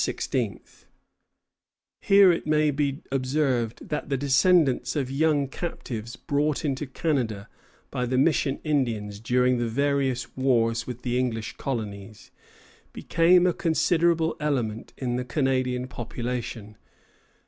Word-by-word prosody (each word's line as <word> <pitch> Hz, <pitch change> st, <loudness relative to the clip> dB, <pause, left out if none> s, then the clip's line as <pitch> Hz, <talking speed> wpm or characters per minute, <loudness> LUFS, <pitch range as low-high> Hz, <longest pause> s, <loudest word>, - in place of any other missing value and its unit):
Here 195 Hz, -2 st, +6 dB
it 165 Hz, -, -2 dB
may 155 Hz, 0 st, +3 dB
be 140 Hz, 0 st, -2 dB
observed 130 Hz, -4 st, -1 dB
that 150 Hz, -, -3 dB
the 135 Hz, -, 0 dB
descendants 145 Hz, +2 st, +3 dB
of 135 Hz, -3 st, -1 dB
young 145 Hz, 0 st, +2 dB
captives 120 Hz, -7 st, -6 dB
brought 150 Hz, 0 st, -1 dB
into 140 Hz, 0 st, -2 dB
Canada 125 Hz, -8 st, -2 dB, 0.4 s
by 125 Hz, 0 st, -2 dB
the 130 Hz, +1 st, 0 dB
mission 140 Hz, -1 st, +2 dB
Indians 115 Hz, -9 st, -1 dB
during 125 Hz, +2 st, +2 dB
the 120 Hz, -, 0 dB
various 135 Hz, 0 st, -1 dB
wars 115 Hz, -3 st, +1 dB
with 125 Hz, -1 st, -7 dB
the 125 Hz, 0 st, 0 dB
English 115 Hz, -4 st, -2 dB
colonies 105 Hz, -5 st, -6 dB, 0.6 s
became 175 Hz, +2 st, +3 dB
a 180 Hz, -, +3 dB
considerable 165 Hz, -1 st, +1 dB
element 125 Hz, -7 st, -2 dB
in 125 Hz, -2 st, -2 dB
the 125 Hz, -, -2 dB
Canadian 130 Hz, -1 st, 0 dB
population. 120 Hz, -3 st, -5 dB
130 Hz, 115 wpm, -26 LUFS, 120-150 Hz, 0.6 s, Here